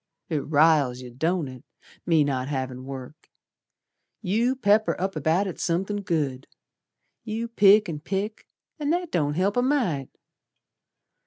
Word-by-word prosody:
"It 155 -3 0
riles 145 -4 +3
yer, 125 - -9
don't 160 +5 -1
it, 130 -1 -10 0.4
me 160 -3 +4
not 130 -2 -1
havin' 130 -2 -4
work. 135 +2 -9 0.9
You 230 +7 +1
pepper 215 -3 +2
up 190 0 -2
about 160 +6 +1
it 185 - -6
somethin' 190 +4 -1
good. 145 -8 -2 0.8
You 225 +1 -3
pick 210 -2 +5
an' 155 -3 -4
pick, 200 +7 -4 0.3
and 295 0 0
that 350 -1 -2
don't 150 -3 0
help 190 +4 +1
a - - +4
mite. 240 - 0
170 Hz, 140 wpm, -25 LUFS, 140-205 Hz, 0.9 s, pick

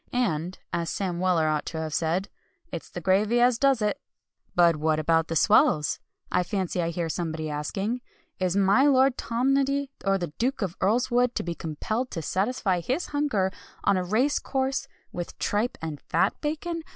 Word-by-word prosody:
And, 180 -8 0 0.2
as 170 -1 -1
Sam 180 -3 -2
Weller 180 -4 +2
ought 155 -1 0
to 165 - -4
have 160 -1 -4
said, 170 +5 0 0.4
"it's - - -6
the - - -7
gravy 210 +5 +3
as 240 -1 +4
does 270 -5 +3
it." 210 +7 -1 0.5
"But 170 -2 +5
what 155 0 +1
about 165 +1 +2
the 165 - -3
swells?" 150 -1 +4 0.3
I 180 - +3
fancy 185 -1 -1
I 165 - 0
hear 170 0 -2
somebody 160 -1 -3
asking, 195 - -2 0.4
"Is 185 0 +1
my 200 +8 +5
Lord 265 -2 +4
Tomnoddy, 275 +3 +1
or 195 -1 +2
the 175 -5 -5
Duke 250 0 0
of 185 -2 -3
Earlswood 245 +4 +2
to - - -1
be 170 - -3
compelled 215 - -3
to 165 - -5
satisfy 195 - 0
his 260 - -2
hunger, 260 -11 +1 0.3
on - - +3
a 185 - 0
race 235 +10 +2
course, 265 0 -1 0.2
with 175 -1 -6
tripe 215 +4 0
and 155 -3 -5
fat - - +1
bacon? 320 +3 -2
195 Hz, 175 wpm, -26 LUFS, 170-250 Hz, 0.5 s, But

